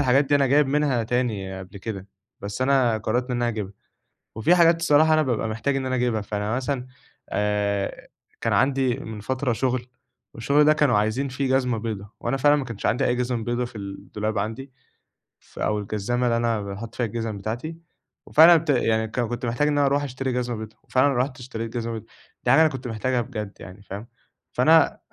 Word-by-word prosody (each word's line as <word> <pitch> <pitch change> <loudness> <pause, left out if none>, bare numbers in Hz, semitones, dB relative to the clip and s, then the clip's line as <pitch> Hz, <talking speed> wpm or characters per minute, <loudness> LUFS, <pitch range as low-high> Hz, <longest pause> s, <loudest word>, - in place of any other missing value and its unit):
الحاجات 135 +1 +4
دي 145 - +1
أنا 140 -1 +4
جايب 145 +2 +4
منها 140 -4 +1
تاني 105 -6 -2
قبل 95 +2 -10
كده، 100 -2 -6 0.3
بس 100 +5 -4
أنا 130 -4 +3
قرّرت 120 +4 -1
إن 125 - 0
أنا 120 0 0
هاجيبها، 105 -3 -4 0.6
وفي 110 +11 +3
حاجات 165 -1 +5
الصراحة 155 0 +5
أنا 155 - +4
بابقى 120 -4 -1
محتاج 115 +6 -1
إن 135 -1 -1
أنا 130 0 -1
أجيبها، 120 -3 0
فأنا 105 +2 -2
مثلًا 130 -1 -2 0.4
آآ، 105 -1 -1 0.3
كان - - 0
عندي 130 -2 +2
من 110 -1 -7
فترة 130 +3 -1
شغل 125 0 -1 0.5
والشغل 140 +6 +3
ده 155 - +6
كانوا 145 -7 +3
عايزين 110 +7 0
فيه 130 +1 -2
جزمة 125 -3 +1
بيضا، 105 -3 -5
وأنا 135 - -1
فعلًا 145 +2 +5
ما 135 - -3
كانش 115 -4 -7
عندي 125 - +2
أي 125 - +2
جزم 125 -2 -1
بيضا 120 +1 -1
في 115 - -10
الدولاب 100 +2 -5
عندي، 120 +6 -4 0.7
ف - - -16
أو 105 0 0
الجزامة 110 +5 -2
اللي 115 0 +2
أنا 115 -2 0
باحُطّ 100 +3 -7
فيها 120 - 0
الجزم 115 -1 -4
بتاعتي، 120 +11 -5 0.5
وفعلًا 165 +3 +8
ابت 165 0 0
يعني 110 -4 +2
ك 110 - -5
كنت 120 +1 -3
محتاج 120 +6 +1
إن 145 -1 +1
أنا 140 -1 +4
أرُوح 140 +1 +1
أشتري 130 -1 -3
جزمة 120 -1 -1
بيضا، 110 0 -9
وفعلًا 135 +2 +2
رُحت 130 +1 -1
اشتريت 115 -2 -6
جزمة 115 0 -3
بيضا، 110 - -6 0.4
دي 125 - +4
حاجة 150 +4 +6
أنا 160 - +5
كنت 130 -3 -6
محتاجها 120 +3 -1
بجد 105 -2 -6
يعني 90 +2 -11
فاهم، 100 +4 -8 0.5
فأنا 160 +5 +6
آآ - - -25
120 Hz, 205 wpm, -24 LUFS, 110-135 Hz, 0.7 s, وفعلًا